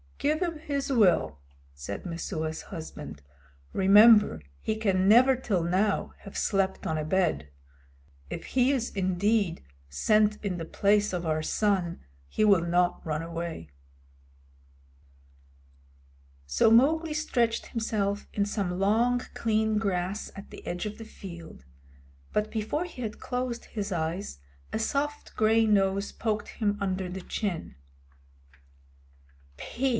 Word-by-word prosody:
"Give 305 +2 +1
him 340 -4 -2
his 280 -3 -3
will," 175 - +3 0.3
said 70 - -7
Messua's 160 -2 -4
husband. 75 - -8 0.5
"Remember 205 - +6 0.2
he 220 - -1
can 195 -4 +1
never 250 +5 +7
till 210 -9 -1
now 190 +4 0
have 200 - -9
slept 195 -1 0
on 160 - -1
a 155 - -1
bed. 155 - 0 0.8
If - - -6
he 255 +1 +3
is 250 -4 -1
indeed 195 - +1 0.3
sent 210 - +2
in 185 -3 -1
the 165 - -5
place 205 +4 +2
of 175 -2 -3
our 155 -1 0
son 185 -1 0 0.3
he 215 - +1
will 200 -5 +5
not 175 +1 +1
run 155 0 -2
away." 165 - -5 2.8
So 70 - +3
Mowgli 305 +7 +4
stretched 240 -7 0
himself 210 -3 -2
in 200 - +1
some 195 -3 -2
long, 230 +5 +3
clean 220 -1 +1
grass 195 -1 -2
at 200 - -10
the - - -11
edge 175 +4 -3
of 210 +1 -6
the 225 - -8
field, 170 - -11 0.7
but 210 0 -1
before 225 +10 -2
he 335 -8 -9
had 215 -2 -5
closed 250 -1 -3
his 205 -2 -5
eyes 165 - -3 0.3
a - - -1
soft 285 +6 -2
gray 220 +1 +4
nose 200 -1 +2
poked 215 -2 -2
him 205 -2 -1
under 190 -1 -2
the 190 +1 -6
chin. 180 - -4 1.8
"Phew!" 265 - -2
200 Hz, 130 wpm, -28 LUFS, 175-225 Hz, 2.8 s, never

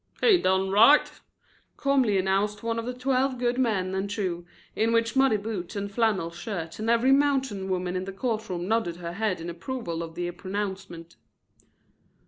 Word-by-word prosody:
"He 410 -6 +5
done 190 +1 +1
right," 230 +9 +6 0.7
calmly 265 -7 +2
announced 195 +2 0
one 230 0 -1
of 230 - -5
the 250 - -2
twelve 260 +1 0
good 245 +1 0
men 195 -7 0
and 190 +1 -2
true, 180 -4 -3 0.3
in 225 +1 +1
the 230 0 +2
muddy 265 -5 +4
boots 205 -2 -5
and 200 0 -3
flannel 205 -7 +1
shirt, 170 -1 -6
and 220 +1 -2
every 235 +3 +4
mountain 270 -9 +1
woman 180 -1 -1
in 185 0 -2
the 195 - -5
court 220 +2 -3
room 175 -1 -3
nodded 220 -6 0
her 170 -1 -6
head 200 -2 -1
in 165 - -6
approval 170 0 -4
of 165 -1 -7
the 175 0 -3
pronouncement. 190 -3 -6
205 Hz, 175 wpm, -26 LUFS, 185-235 Hz, 0.7 s, right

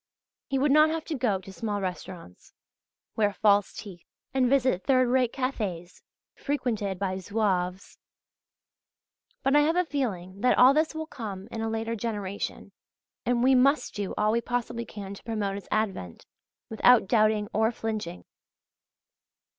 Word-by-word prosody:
He 270 - -1
would 275 +2 +2
not 305 +2 +6
have 320 0 -3
to - - -4
go 240 -7 +1
to 190 +1 -11
small 210 -1 -3
restaurants, 180 - -7 0.6
wear 210 -2 +2
false 205 -1 +3
teeth 185 -5 -10 0.3
and 260 -2 +2
visit 260 -8 +2
third 255 -2 +3
rate 250 -2 +2
cafés 205 -10 -4 0.3
frequented 220 -9 -2
by 185 -1 -2
Zouaves.{AA} 190 -2 -2 1.4
But 275 - +3
I - - +7
have 310 +3 +2
a 360 0 +2
feeling 200 - -3
that 250 - +3
all 255 +2 +7
this 310 +2 +1
will 315 0 -3
come 210 -9 -7
in 225 - -4
a 225 - -1
later 225 +1 -2
generation. 205 -3 -4 0.6
And 245 0 +2
we 265 +1 +5
must 275 +4 +3
do 205 -2 -4
all 210 0 +2
we 235 +1 +1
possibly 240 -1 -3
can 200 -2 -8
to 200 - -12
promote 210 -4 -2
its 200 - -8
advent, 190 - -2 0.4
without 225 0 +5
doubting 215 -1 +2
or 220 +2 +2
flinching. 215 -7 -5
220 Hz, 155 wpm, -27 LUFS, 195-255 Hz, 1.4 s, I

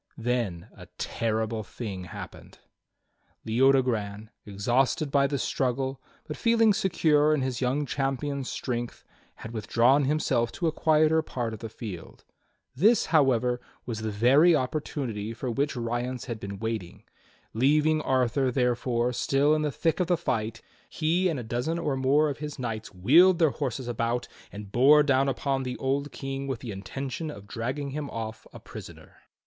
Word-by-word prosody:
Then 115 -7 -2
a - - -12
terrible 110 0 -2
thing 100 -3 -6
happened. 85 - -10 0.9
Leodogran, 115 -4 +1 0.2
exhausted 125 +8 0
by 140 -1 +3
the 140 0 -2
struggle, 130 +1 -1 0.3
but 150 - -5
feeling 230 -2 +4
secure 155 -5 +3
in 140 - -1
his 130 -1 -3
young 135 +4 0
champion's 135 0 -2
strength, 120 -2 -4 0.3
had 110 - -9
withdrawn 120 +5 +3
himself 130 -5 +1
to 175 - -3
a 160 - +3
quieter 155 0 +3
part 120 -7 -4
of 110 - -7
the 115 - -6
field. 100 -6 -9 0.5
This, 215 - +4
however, 125 -5 +3 0.2
was 110 -3 -4
the 110 - -2
very 135 +11 +5
opportunity 125 -6 -3
for 125 +1 -3
which 140 +5 -1
Rience 120 +1 -3
had 115 -3 -5
been 100 -1 -6
waiting. 110 -5 -5 0.5
Leaving 150 +6 +3
Arthur, 130 -1 +1
therefore, 125 -1 0
still 135 +4 +2
in 155 - +1
the 150 -1 0
thick 165 +4 0
of 180 - +1
the 175 -1 +2
fight, 115 -8 -2 0.3
he 175 +3 +1
and 155 -6 -2
a - - -5
dozen 120 +9 -2
or 150 -5 -1
more 135 +4 +3
of 145 -1 -4
his 150 -1 -6
knights 115 -4 -4
wheeled 160 - +5
their 160 -4 +3
horses 130 -3 -4
about 120 +1 -1 0.2
and 100 -1 -9
bore 145 +6 +6
down 135 -1 +2
upon 135 +1 -1
the 125 -1 -4
old 140 +2 -1
King 135 0 -5
with 135 -3 -2
the 120 - -6
intention 135 - -5
of 100 -9 -9
dragging 130 +6 -4
him 145 0 -4
off 110 -1 -6
a - - -11
prisoner. - - -12
130 Hz, 160 wpm, -27 LUFS, 115-145 Hz, 0.9 s, bore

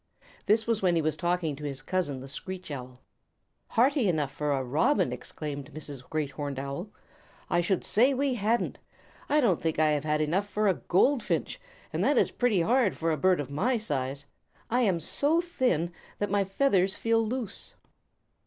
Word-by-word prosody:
This 220 +2 +4
was 230 -2 0
when 180 -3 +3
he 165 - +3
was 155 -1 +1
talking 175 -2 -1
to 150 - -10
his 135 -2 -4
cousin, 145 -6 -1
the 135 - -8
Screech 185 +4 -6
Owl. 125 -2 -7 0.7
"Hearty 260 0 +3
enough 150 -5 0
for 150 +1 -2
a 135 -2 0
Robin!" 135 - +2
exclaimed 145 +3 -6
Mrs. 145 -4 -4
Great 155 -3 -2
Horned 145 -2 -4
Owl. 140 +9 -4 0.6
"I 175 - +3
should 180 +1 0
say 235 +8 +4
we 275 0 +1
hadn't. 230 +1 0 0.5
I 300 - +4
don't 210 - +2
think 160 -1 -1
I 155 0 +4
have 145 -1 0
had 150 0 +1
enough 180 +7 0
for 210 +2 +1
a 195 - +5
Goldfinch, 235 +7 +1 0.3
and - - 0
that - - +3
is - - +3
pretty 230 -7 +2
hard 230 +1 +2
for 165 0 0
a - - +2
bird 185 +2 +3
of 140 -2 -4
my 235 - +1
size. 140 - -3 0.5
I 245 +2 +3
am 190 -8 +2
so 295 - +1
thin 250 - 0 0.3
that 205 -1 -2
my 200 -1 +2
feathers 195 -3 +2
feel 230 0 +2
loose." 230 -2 -4
180 Hz, 185 wpm, -28 LUFS, 150-225 Hz, 0.7 s, a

